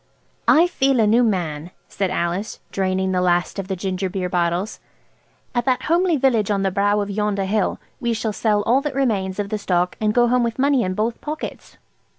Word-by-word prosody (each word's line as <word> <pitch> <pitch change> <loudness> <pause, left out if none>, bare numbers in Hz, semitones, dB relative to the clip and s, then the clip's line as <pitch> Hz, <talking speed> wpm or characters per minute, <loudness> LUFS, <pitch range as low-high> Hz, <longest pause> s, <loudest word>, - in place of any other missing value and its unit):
"I 330 +3 +6
feel 275 -7 +1
a 220 - +4
new 225 +4 +4
man," 175 -8 -1 0.2
said 195 -2 -2
Alice, 180 +3 -2
draining 190 0 0
the 180 -1 +1
last 175 +2 +1
of 190 - -4
the 190 - -2
ginger 185 0 -2
beer 180 -1 -3
bottles. 175 +3 -1 0.7
"At 240 -1 0
that 255 -1 +1
homely 345 0 +2
village 240 -6 +2
on 200 -2 +1
the 195 - +1
brow 205 +2 +2
of 200 0 -3
yonder 205 -1 -1
hill 205 0 0 0.2
we 235 -3 -1
shall 220 -1 -2
sell 210 -1 +1
all 250 +6 +3
that 285 -2 -4
remains 200 -8 0
of 205 -1 -2
the 215 - -2
stock, 180 -2 0
and 215 -1 +2
go 240 +2 +3
home 250 +1 +2
with 230 -1 -1
money 275 -1 +3
in 185 -2 -2
both 225 +3 -2
pockets." 305 +1 -6
205 Hz, 205 wpm, -21 LUFS, 190-240 Hz, 0.7 s, I